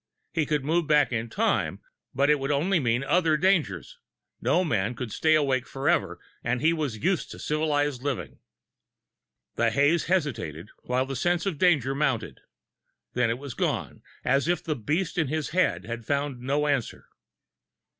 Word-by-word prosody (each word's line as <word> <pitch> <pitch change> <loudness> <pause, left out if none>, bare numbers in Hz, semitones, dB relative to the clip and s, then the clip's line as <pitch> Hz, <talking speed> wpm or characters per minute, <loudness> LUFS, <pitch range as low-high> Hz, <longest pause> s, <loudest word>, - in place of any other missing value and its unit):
He 160 -4 0
could 150 -3 0
move 165 +1 +1
back 150 -3 +4
in 115 0 -2
time, 225 - 0 0.4
but 140 +2 +3
it 150 - +3
would 135 +1 -3
only 165 +6 +2
mean 120 -1 +1
other 160 +1 +2
dangers 190 - 0 0.4
no 185 - +2
man 115 - 0
could 115 -2 -5
stay 155 +6 +3
awake 135 -4 +1
forever, 135 +1 0 0.2
and 125 +1 0
he 160 +4 +3
was 150 -9 -2
used 185 0 +1
to - - -9
civilized 145 -3 0
living. 140 -3 -4 1.2
The 115 0 +3
haze 145 +8 +2
hesitated, 110 - -2
while 125 +1 0
the 135 0 -5
sense 175 +6 0
of 175 -7 -2
danger 145 -8 +3
mounted. 135 -6 -1 0.7
Then 125 -2 +2
it 115 - -1
was 140 -1 -7
gone, - - -2 0.2
as 135 +4 +2
if 175 0 0
the 155 -3 -1
beast 165 - -1
in 160 - +1
his 155 +1 -2
head 180 - +1
had 115 +1 -5
found 140 0 -1
no 140 +4 0
answer. 140 -5 -1
145 Hz, 165 wpm, -26 LUFS, 125-160 Hz, 1.2 s, back